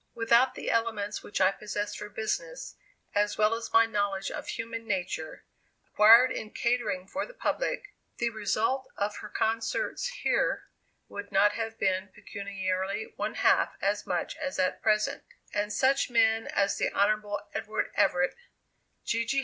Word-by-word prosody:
Without 235 +2 +4
the - - -3
elements 220 -3 -1
which 205 - -4
I 190 0 +5
possess 205 0 -4
for 210 - -7
business, - - -4 0.4
as 205 0 +1
well 215 +1 +3
as 230 0 -4
my 230 0 +6
knowledge 205 -3 -1
of - - -6
human 230 0 -5
nature, 175 -6 -3 0.4
acquired 230 +4 +7
in 215 - -4
catering 235 -6 -1
for 285 +9 -3
the - - -14
public, 420 -4 -2 0.2
the 235 0 0
result 220 +5 0
of 205 +1 -1
her 210 - -8
concerts 225 - -1 0.2
here - - +1 0.4
would 200 0 -8
not 200 +1 +5
have 225 0 -4
been 190 -1 0
pecuniarily 195 - -3
one - - -3
half - - +3
as - - -1
much - - -2
as 280 -3 -4
at 185 0 0
present 215 -1 +1 0.3
and 205 0 -1
such 265 +6 +2
men 225 -1 +3
as 200 0 +1
the - - +2
Hon. 205 0 +1 0.2
Edward 215 +1 -2
Everett, 180 -2 +2 0.7
G. 230 0 +1
G. 270 +4 0
215 Hz, 155 wpm, -29 LUFS, 200-230 Hz, 0.7 s, acquired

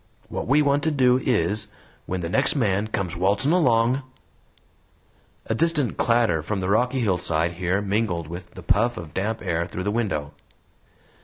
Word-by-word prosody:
What - - -4
we 145 +4 +4
want 140 0 +2
to - - +3
do 130 -4 +3
is, 105 -3 0 0.4
when 95 0 -3
the 85 - -3
next 90 - +2
man 105 -5 +1
comes 95 -5 -3
waltzin' 100 - +2
along 125 -6 +3 0.8
" - - -37
A - - -1
distant 150 -1 +1
clatter 115 -9 +2
from 95 +6 -3
the 95 0 -2
rocky 125 +5 +2
hillside 85 -5 0
here 90 +3 -1
mingled 100 -5 -1
with 85 +1 -9
the 95 - -9
puff 115 +7 +1
of 80 -3 -8
damp 110 +4 -2
air 85 +1 -1
through 95 - -5
the 105 - -1
window. 95 -11 -2
105 Hz, 170 wpm, -24 LUFS, 90-120 Hz, 0.8 s, we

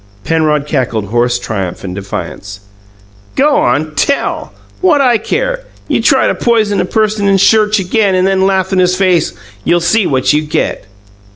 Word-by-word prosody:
Penrod 155 -3 0
cackled 125 -9 -2
hoarse 120 +2 +1
triumph 100 -7 -5
and 90 -2 -5
defiance. 100 +1 -7 0.7
"Go 285 +2 +3
on! 150 +5 0
Tell! 280 - -1 0.3
What 345 -6 +3
'I 245 -5 +3
care? - - -2 0.3
You - - 0
try - - +3
to - - +1
poison 220 -4 +1
a - - -1
person 215 +1 0
in 195 0 +3
church 215 +2 +3
again, 195 +1 +1
and 185 0 +2
then 190 0 +2
laugh 190 0 0
in 185 - +2
his 180 0 +2
face, 185 - +1 0.3
you'll 175 - +2
see 195 +4 +1
what 130 +1 +1
you 150 - +2
get!" 150 -9 -3
185 Hz, 170 wpm, -13 LUFS, 135-215 Hz, 0.7 s, Go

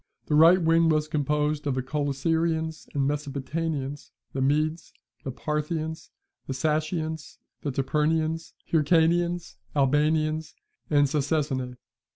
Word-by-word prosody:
The - - -2
right 165 +5 +7
wing 165 -1 +4
was 155 -1 +2
composed 150 0 0
of 135 - 0
the 130 - -1
Coelosyrians 160 +3 -1
and 135 -1 +2
Mesopotamians, 145 0 -3 0.2
the 135 - -2
Medes, 155 +4 0 0.3
the - - -4
Parthians, 155 +3 -3 0.4
the 135 - -3
Sacians, 155 +2 -2 0.2
the 145 - -2
Tapurians, 155 +4 0 0.2
Hyrcanians, 170 +2 +2 0.2
Albanians, 155 +3 +1 0.3
and 145 -1 +4
Sacesinae. 140 -3 -1
155 Hz, 110 wpm, -26 LUFS, 145-160 Hz, 0.4 s, right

